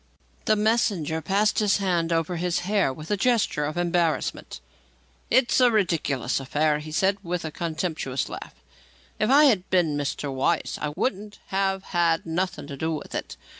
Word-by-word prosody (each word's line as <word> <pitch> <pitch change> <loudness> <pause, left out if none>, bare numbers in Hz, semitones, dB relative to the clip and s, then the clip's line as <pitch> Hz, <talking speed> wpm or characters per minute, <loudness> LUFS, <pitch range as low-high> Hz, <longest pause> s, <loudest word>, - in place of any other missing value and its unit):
The 215 - +4
messenger 205 -7 +1
passed 200 +4 +1
his 210 -2 +3
hand 175 -4 0
over 165 +1 0
his 175 +1 -1
hair 195 -5 +1
with 155 +6 -8
a - - +3
gesture 215 -9 +1
of 150 +3 -4
embarrassment. 175 -2 -1 0.7
"It's 260 -1 +3
a 250 -1 +6
ridicklus 165 - 0
affair," 150 +3 +1
he 155 +1 -8
said, 190 +5 +2
with 175 -1 -3
a 160 - -4
contemptuous 155 -5 -3
laugh. - - -8 0.6
"If 215 - +1
I 285 +3 +7
had 215 -11 +3
been 175 -5 +2
Mr. 145 -1 -3
Weiss, 140 +5 0
I 150 - -2
wouldn't 205 0 -2
have 195 0 0
had 170 -2 +1
nothing 175 +1 -2
to 140 -1 -7
do 160 +3 -1
with - - -8
it. - - -5
175 Hz, 170 wpm, -25 LUFS, 155-200 Hz, 0.7 s, I